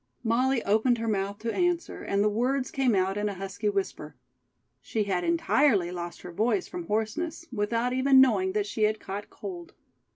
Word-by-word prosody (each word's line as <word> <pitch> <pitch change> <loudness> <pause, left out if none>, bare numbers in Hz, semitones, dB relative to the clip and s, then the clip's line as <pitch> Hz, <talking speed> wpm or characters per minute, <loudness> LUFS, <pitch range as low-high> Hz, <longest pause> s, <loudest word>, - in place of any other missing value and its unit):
Molly 245 +2 +1
opened 220 +4 +2
her 230 0 -3
mouth 200 -1 -1
to 230 0 -2
answer, 350 -2 -1
and 200 0 0
the - - +3
words 255 +5 0
came 260 -5 +2
out 190 +1 +1
in 210 0 0
a 200 - -5
husky 195 +3 -3
whisper. 190 -7 -3 0.7
She 215 - -1
had 190 -3 -1
entirely 290 - +2
lost 175 -1 -6
her 180 - -7
voice 230 - 0
from 350 -1 -7
hoarseness, 300 +11 -2
without 230 +2 0
even 265 +1 +5
knowing 200 -8 +4
that 210 -1 0
she 215 +1 -5
had 215 0 0
caught 200 +2 -6
cold. 180 -4 -8
215 Hz, 185 wpm, -27 LUFS, 195-260 Hz, 0.7 s, even